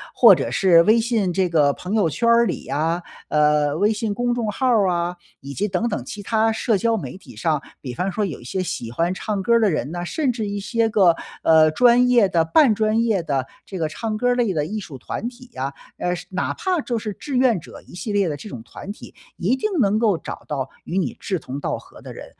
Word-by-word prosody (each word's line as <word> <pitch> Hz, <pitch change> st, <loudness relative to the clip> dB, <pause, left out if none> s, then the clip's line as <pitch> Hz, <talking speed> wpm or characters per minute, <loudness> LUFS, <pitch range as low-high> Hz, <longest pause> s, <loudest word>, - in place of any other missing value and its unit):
或 -, -, +8 dB
者 -, -, -1 dB
是 175 Hz, -4 st, +5 dB
微 215 Hz, +7 st, +4 dB
信 225 Hz, -5 st, 0 dB
这 185 Hz, +1 st, +1 dB
个 150 Hz, -4 st, +3 dB
朋 180 Hz, +7 st, -6 dB
友 210 Hz, -7 st, +3 dB
圈 165 Hz, +10 st, -1 dB
儿 235 Hz, 0 st, +5 dB
里 185 Hz, -, -4 dB
啊， 165 Hz, +5 st, -1 dB, 0.2 s
呃， 150 Hz, -1 st, +2 dB
微 205 Hz, +5 st, +3 dB
信 215 Hz, -1 st, -2 dB
公 245 Hz, +1 st, 0 dB
众 235 Hz, -3 st, -2 dB
号 260 Hz, -, -2 dB
儿 220 Hz, -6 st, +4 dB
啊， 175 Hz, 0 st, -1 dB, 0.3 s
以 140 Hz, +1 st, -8 dB
及 205 Hz, +8 st, -1 dB
等 195 Hz, +4 st, -1 dB
等 210 Hz, -, -3 dB
其 205 Hz, -, -8 dB
他 225 Hz, +2 st, +2 dB
社 220 Hz, 0 st, 0 dB
交 225 Hz, +3 st, +1 dB
媒 -, -, -6 dB
体 190 Hz, -, -14 dB
上， 155 Hz, -4 st, 0 dB, 0.2 s
比 125 Hz, -3 st, -6 dB
方 180 Hz, +9 st, -2 dB
说 205 Hz, +3 st, -1 dB
有 175 Hz, -, -6 dB
一 -, -, -13 dB
些 185 Hz, +10 st, -3 dB
喜 180 Hz, -11 st, -4 dB
欢 170 Hz, +8 st, 0 dB
唱 200 Hz, +1 st, -3 dB
歌 235 Hz, +3 st, +4 dB
的 220 Hz, -2 st, +3 dB
人 150 Hz, -4 st, -2 dB
呢， 175 Hz, 0 st, -4 dB
甚 275 Hz, -, 0 dB
至 220 Hz, -3 st, -3 dB
一 200 Hz, 0 st, -3 dB
些 225 Hz, +3 st, 0 dB
个， 190 Hz, -6 st, +4 dB, 0.3 s
呃， 160 Hz, -1 st, +6 dB
专 245 Hz, +7 st, +4 dB
业 240 Hz, -5 st, +5 dB
的、 170 Hz, -3 st, +2 dB
半 225 Hz, -, +4 dB
专 215 Hz, +1 st, +1 dB
业 220 Hz, -5 st, +1 dB
的 140 Hz, -5 st, -1 dB, 0.2 s
这 190 Hz, -, -6 dB
个 160 Hz, -3 st, 0 dB
唱 215 Hz, +7 st, -4 dB
歌 245 Hz, +3 st, +1 dB
儿 -, -, +4 dB
类 230 Hz, -7 st, 0 dB
的 150 Hz, -1 st, 0 dB
艺 215 Hz, +7 st, -4 dB
术 160 Hz, -9 st, -9 dB
团 210 Hz, -, -5 dB
体 250 Hz, 0 st, -16 dB
啊。 135 Hz, +1 st, -3 dB, 0.3 s
呃， 180 Hz, 0 st, 0 dB
是 180 Hz, 0 st, -8 dB
哪 185 Hz, -, -1 dB
怕 365 Hz, -4 st, -1 dB
就 240 Hz, -4 st, -2 dB
是 215 Hz, -1 st, -4 dB
志 270 Hz, +5 st, -4 dB
愿 250 Hz, -6 st, +3 dB
者 -, -, -12 dB
一 -, -, -16 dB
系 195 Hz, +5 st, -5 dB
列 200 Hz, -2 st, +2 dB
的 150 Hz, -, -2 dB
这 145 Hz, +9 st, -10 dB
种 120 Hz, -, -8 dB
团 190 Hz, -, -9 dB
体， 210 Hz, -, -12 dB, 0.2 s
一 195 Hz, +8 st, +1 dB
定 345 Hz, +11 st, -2 dB
能 210 Hz, -2 st, +3 dB
够 215 Hz, -6 st, +2 dB
找 -, -, -8 dB
到 135 Hz, -3 st, -3 dB, 0.2 s
与 180 Hz, -, -3 dB
你 190 Hz, -, -1 dB
志 190 Hz, -, -2 dB
同 140 Hz, -3 st, -7 dB
道 -, -, -2 dB
合 -, -, -15 dB
的 -, -, -9 dB
人。 -, -, -9 dB
195 Hz, 270 characters per minute, -22 LUFS, 165-225 Hz, 0.3 s, 或